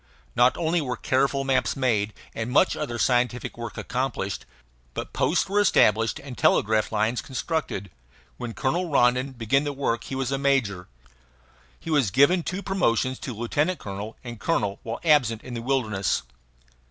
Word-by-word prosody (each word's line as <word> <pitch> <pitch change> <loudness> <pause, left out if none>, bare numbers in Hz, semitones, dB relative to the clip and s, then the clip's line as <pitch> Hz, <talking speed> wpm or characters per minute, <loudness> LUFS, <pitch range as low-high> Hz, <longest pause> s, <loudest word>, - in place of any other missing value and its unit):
Not 125 +1 +4
only 165 0 +1
were 125 -4 -3
careful 135 +2 +1
maps 135 -1 +1
made 110 -6 0 0.2
and 115 +1 -3
much 145 +9 +3
other 130 -6 -3
scientific 125 +1 +1
work 115 -3 -7
accomplished, 125 -6 -3 0.5
but - - -5
posts - - +1
were 200 +2 +1
established 115 - +3
and 135 -3 -9
telegraph 110 -1 +2
lines 110 +2 0
constructed. 130 - -3 0.5
When 115 -2 -6
Colonel 170 +7 -1
Rondon 125 -1 +2
began 125 +4 +1
the 145 -1 -2
work 120 -4 -1
he 135 - -5
was 135 0 -2
a 135 - 0
major. 125 -10 +1 0.9
He 165 - -6
was 140 -9 +3
given 140 - +4
two 185 +4 -4
promotions, 130 - 0
to 130 - -5
lieutenant 145 - 0
colonel 105 -1 -7
and 120 -3 -8
colonel, 105 -10 0
while 115 +1 -5
absent 130 -9 +3
in 125 - -8
the 115 - -4
wilderness. 110 - 0
125 Hz, 160 wpm, -25 LUFS, 115-140 Hz, 0.9 s, Not